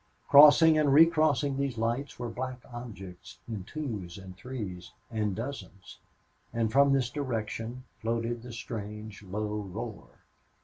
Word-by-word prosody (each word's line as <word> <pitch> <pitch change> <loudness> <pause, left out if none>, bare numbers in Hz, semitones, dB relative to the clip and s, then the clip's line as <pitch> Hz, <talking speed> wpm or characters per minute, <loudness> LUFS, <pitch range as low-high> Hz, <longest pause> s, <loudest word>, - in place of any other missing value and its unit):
Crossing 150 +2 +8
and 145 -2 +3
re 155 +4 +9
crossing 150 -4 +1
these 140 -3 -2
lights 120 +5 -2
were 120 - -4
black 125 +2 -5
objects, 95 -7 -9
in 110 -5 -5
twos 110 - -5
and 95 -1 -10
threes 100 -5 -7 0.2
and 105 -3 -1
dozens. 115 -5 -7 0.5
And 115 -1 0
from 140 +2 +5
this 130 -3 +1
direction 120 -2 -4 0.2
floated 115 +1 -2
the 125 +1 -9
strange, 105 -2 -7
low 105 +2 -3
roar. 105 +3 -7
115 Hz, 135 wpm, -29 LUFS, 105-135 Hz, 0.5 s, re